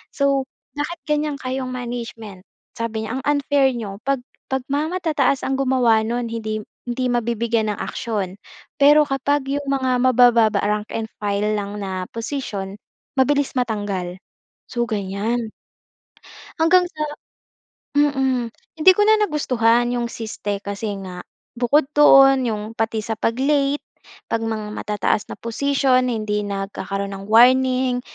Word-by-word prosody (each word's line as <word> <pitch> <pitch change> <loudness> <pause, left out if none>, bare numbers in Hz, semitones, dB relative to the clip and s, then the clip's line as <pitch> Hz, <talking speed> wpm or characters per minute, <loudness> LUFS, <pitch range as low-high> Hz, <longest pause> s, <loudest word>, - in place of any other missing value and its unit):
So, 275 -2 +1 0.3
"Bakit 310 +4 -4
ganyan 300 -1 0
kayong 260 -1 -4
management" 230 -6 -7 0.3
sabi 225 -1 -2
niya, 255 +4 -3
"Ang - - -9
unfair 285 -2 +2
n'yo 205 -4 -6
'pag 275 -3 0 0.2
'pag 265 -1 -2
mga 295 +2 +1
matataas 290 -6 +1
ang 270 0 -1
gumawa 255 -4 +3
no'n 235 0 -2
hindi 215 -2 -3 0.2
hindi 250 +1 -1
mabibigyan 235 -2 0
ng - - -13
aksiyon 200 -5 -3 0.4
pero 295 +2 +7
kapag 285 0 0
'yong 285 0 -2
mga 260 -2 +1
mabababa, 240 -4 +4
rank 210 +1 -1
and 220 -1 -4
file 205 +1 0
lang 200 0 -5
na 190 -2 -4
posisyon 215 -5 -4 0.4
mabilis 285 +1 +2
matanggal." 205 -7 -2 0.6
So 240 -1 -1
ganyan. 215 +2 -2 1.1
Hanggang 355 +2 +5
sa 305 - -4 0.9
mm, 265 -5 +1 0.2
hindi 320 +4 +7
ko 415 - +1
na 435 0 +5
nagustuhan 240 - +2
yung 240 - -1
siste 205 -3 -5
kasi 200 +1 -4
nga 180 -1 -7 0.4
bukod 265 +5 +3
doon, 270 -3 +6
yung 210 -2 -2
pati 225 -1 -1
sa 225 - -2
pag 230 - 0
late, 280 +1 +1 0.5
'pag 230 - +1
mga 215 -2 -3
matataas 210 0 -1
na - - -6
posisyon 255 +1 +1
hindi 215 -2 -1
nagkakaroon 195 0 -4
ng 195 0 -9
warning 255 +2 +4
240 Hz, 135 wpm, -21 LUFS, 215-270 Hz, 1.1 s, pero